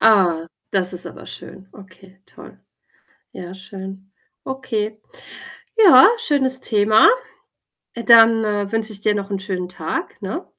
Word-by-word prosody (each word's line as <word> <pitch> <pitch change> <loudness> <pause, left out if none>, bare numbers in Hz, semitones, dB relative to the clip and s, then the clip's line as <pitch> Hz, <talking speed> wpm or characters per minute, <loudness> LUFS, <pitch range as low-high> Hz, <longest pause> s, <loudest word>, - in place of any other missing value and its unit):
Ah, 185 -7 +3 0.2
das 185 -2 +1
ist 180 - -4
aber - - -11
schön. 190 0 -10
Okay, 190 -1 -18
toll. - - -15 0.7
Ja, 180 +1 -9
schön. 190 0 -10 0.3
Okay. 220 -5 -4 0.8
Ja, 375 - +8
schönes 270 - 0
Thema. 215 - +4 0.9
Äh, 235 - -7
dann, 225 -1 +6
äh, 205 -2 -2
wünsche 225 -1 -2
ich 200 - -5
dir 210 - +1
noch 200 0 -5
'n 195 - -3
schönen 185 -2 -5
Tag, 180 - -6
ne? - - -6
205 Hz, 135 wpm, -19 LUFS, 190-225 Hz, 0.9 s, Ja